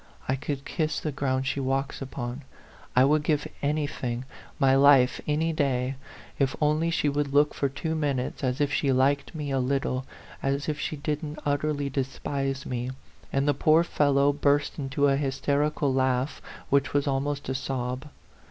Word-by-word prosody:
I 130 - +2
could 135 0 -4
kiss 155 -1 -1
the 155 - -3
ground 130 -1 -1
she 130 +1 -1
walks 135 +1 -1
upon. 130 0 -5 0.5
I 125 +1 +6
would 150 +2 +3
give 150 -1 0
anything 140 -4 -2 0.3
my 135 -2 +4
life 135 -2 +5
any 160 +2 +1
day 135 -4 0 0.5
if 135 -1 +1
only 150 +2 +2
she 165 -2 +1
would 145 0 0
look 145 +1 +4
for 140 - 0
two 160 +4 -3
minutes 140 -4 -2
as 130 +1 0
if 145 -1 +1
she 140 - +2
liked 140 +4 +1
me 150 -3 -3
a 135 - +1
little 130 0 -1 0.3
as 140 +1 -1
if 155 0 -2
she - - -2
didn't 150 +1 -3
utterly 145 0 0
despise 135 0 -2
me 125 0 -3 0.2
;" - - -27
and 135 +1 +1
the 145 - +4
poor 155 +4 +4
fellow 145 -3 +3
burst 145 +1 +1
into 140 +1 +1
a 135 -1 +3
hysterical 140 +1 0
laugh, 130 +1 0 0.3
which 140 0 +2
was 145 - +3
almost 140 +1 -1
a 130 - -1
sob. 130 +1 -3
140 Hz, 170 wpm, -27 LUFS, 135-145 Hz, 0.5 s, I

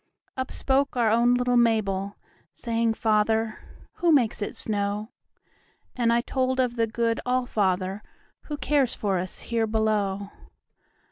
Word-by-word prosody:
Up 260 -1 -4
spoke 275 0 0
our 230 -3 +3
own 240 +2 +4
little 245 0 +2
Mabel, 200 -4 +1 0.4
Saying, 230 -1 0
"Father, 220 0 +1 0.4
who 345 -1 +3
makes 245 -8 +2
it 205 - -3
snow?"And 210 +3 -4
I 235 0 +3
told 260 +1 -1
of 250 -2 +1
the 230 -1 +1
good 230 0 0
All 250 0 0
fatherWho 195 +8 -3
cares 280 -5 +1
for 195 -3 0
us 185 0 -6
here 230 -1 -1
below. 205 -2 0
225 Hz, 130 wpm, -26 LUFS, 210-245 Hz, 0.4 s, own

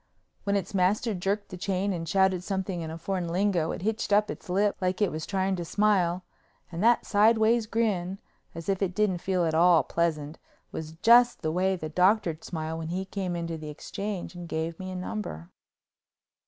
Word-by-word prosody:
When 200 0 +1
its 195 +1 -2
master 200 +4 +2
jerked 195 +3 -2
the 185 - -7
chain 195 +1 -1
and 165 -2 -4
shouted 190 -1 +2
something 190 -2 -2
in 160 - -5
a 160 - -6
foreign 180 +1 -2
lingo 175 -2 +1
it - - -6
hitched 220 0 -1
up 210 +1 +3
its - - -10
lip 200 +3 +1
like 185 0 0
it 205 -3 +2
was 155 0 -5
trying 190 -1 0
to 175 - -3
smile, 185 -2 +1 0.5
and 170 +3 -3
that 235 +1 +4
sideways 220 +1 +4
grin, 200 -5 0 0.4
as 165 -1 -7
if 195 -1 0
it 180 -2 -1
didn't 200 -4 +1
feel 185 -1 0
at 160 - 0
all 170 0 +5
pleasant, 155 -2 -1 0.3
was 160 0 -6
just 240 +1 +6
the 155 - 0
way 190 +3 +1
the 155 -4 -5
Doctor'd 180 0 +2
smile 160 -1 -4
when 160 - -5
he 185 +3 -3
came 190 -2 -3
into 165 -1 -4
the 155 -1 -7
Exchange 190 +4 -5
and 175 -1 -8
gave 160 +1 -3
me 185 0 -5
a 185 - -5
number. 180 - -5
185 Hz, 195 wpm, -27 LUFS, 170-200 Hz, 0.5 s, just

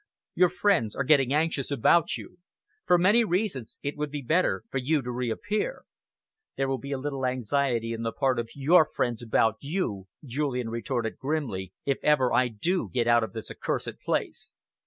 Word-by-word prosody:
Your 180 -1 +4
friends 180 - +1
are 140 - 0
getting 135 -2 +4
anxious 150 -2 0
about 150 +4 +3
you. 180 - -12 0.5
For 180 - +6
many 205 +7 +5
reasons 180 - -2
it 145 - -3
would 150 0 -2
be 145 -1 -5
better 165 +8 +1
for 135 - -1
you 145 +2 +1
to 125 - -4
reappear." 125 - -2 0.7
"There 135 - 0
will 135 -1 -1
be 140 - -7
a 140 - -1
little 135 0 -4
anxiety 125 -2 0
on 115 - -6
the 115 0 -1
part 130 -2 +1
of 115 -1 -3
your 155 +4 +5
friends 120 -2 -1
about 110 -1 +2
you," 140 - -3 0.2
Julian 125 -2 -2
retorted 115 -1 -3
grimly, 130 - -3
"if 140 -1 0
ever 140 -4 +3
I 125 0 +4
do 165 - -1
get 120 -2 +1
out 120 -1 +5
of 110 - -5
this 110 -1 -6
accursed - - -4
place." - - -3
135 Hz, 180 wpm, -27 LUFS, 120-155 Hz, 0.7 s, For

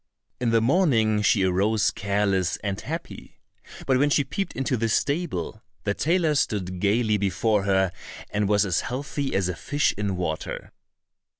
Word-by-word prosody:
In 120 - 0
the 115 0 +3
morning 115 - +3
she 100 -1 +3
arose 100 +4 +2
careless 100 -2 0
and 100 -2 -3
happy, - - -7 0.5
but 130 -1 +2
when 145 +2 +3
she 145 0 +3
peeped 195 +7 -4
into 135 -1 -1
the 115 -1 -1
stable, 140 - -1 0.2
the 100 - 0
tailor 165 - +1
stood 95 -9 -1
gaily 105 +2 +2
before 100 +1 +1
her, 95 -2 +2 0.4
and 105 -1 0
was 105 0 +3
as 90 -4 0
healthy 135 +3 -3
as 95 -2 +1
a 90 - -3
fish 145 - 0
in 100 -2 -1
water. 85 -3 -4
105 Hz, 160 wpm, -25 LUFS, 95-130 Hz, 0.5 s, the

